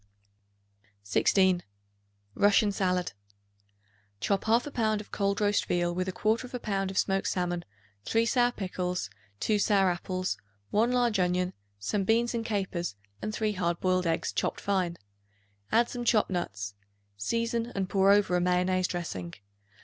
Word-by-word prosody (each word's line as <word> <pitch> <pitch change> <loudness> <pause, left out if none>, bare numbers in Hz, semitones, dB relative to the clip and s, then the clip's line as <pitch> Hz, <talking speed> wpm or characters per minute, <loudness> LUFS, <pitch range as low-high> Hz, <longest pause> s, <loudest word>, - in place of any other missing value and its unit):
16. 180 - +3 0.7
Russian 205 - +4
Salad. 185 -2 0 1.1
Chop 195 - 0
1/2 235 +6 +2
pound 215 -2 +1
of 210 - -10
cold 200 -1 0
roast 205 -1 +2
veal 175 0 +1
with 185 +1 -2
1/4 225 +6 -1
pound 195 -4 -1
of 190 - -6
smoked 195 0 +1
salmon, 175 -1 -1 0.4
3 225 0 +2
sour 245 0 +3
pickles, 180 - -3 0.3
2 215 -2 +2
sour 195 -3 +3
apples, 185 +1 -2 0.3
1 230 +4 +3
large 240 -4 +2
onion, 180 0 +1 0.2
some 195 - -1
beans 230 +4 +2
and 230 -1 -1
capers 190 - -2 0.3
and 215 - -2
3 215 0 0
hard 175 -4 -1
boiled 185 -1 +1
eggs 165 0 0
chopped - - -1
fine. 185 -4 0 0.7
Add 235 +1 +4
some 245 -1 -5
chopped 220 -4 +3
nuts. 105 - -3 0.4
Season 230 - -1
and 195 -1 -1
pour 195 0 +4
over 200 -3 +4
a 180 - +2
mayonnaise 180 0 +2
dressing. 95 - -5
195 Hz, 140 wpm, -29 LUFS, 180-215 Hz, 1.1 s, Russian